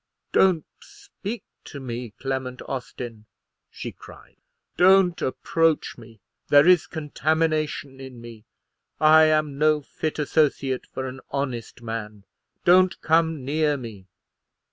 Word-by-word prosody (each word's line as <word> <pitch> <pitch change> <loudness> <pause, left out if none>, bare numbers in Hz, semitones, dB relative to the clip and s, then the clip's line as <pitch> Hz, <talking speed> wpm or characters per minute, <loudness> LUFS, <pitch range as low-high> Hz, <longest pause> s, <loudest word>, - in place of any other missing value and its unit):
"Don't 180 -5 +3 0.2
speak 400 - -8 0.2
to 140 - -9
me, 120 -4 -6
Clement 130 -1 -4
Austin," 120 -4 -7 0.4
she - - -7
cried; - - -16 0.4
"don't 185 -1 +4
approach 165 +4 0
me. 115 -2 -15 0.3
There 145 +2 +6
is 180 -2 +5
contamination 155 -2 -1
in 130 -2 -10
me. 115 -2 -12 0.5
I 155 +1 +7
am 155 -2 +1
no 155 0 +3
fit 155 +2 -4
associate 140 -3 0
for 130 - -5
an 130 +1 -7
honest 130 -4 -4
man. 105 -3 -6 0.4
Don't 185 +1 +5
come 160 -3 +1
near 150 +1 +1
me." 110 -7 -10
145 Hz, 120 wpm, -24 LUFS, 125-160 Hz, 0.5 s, I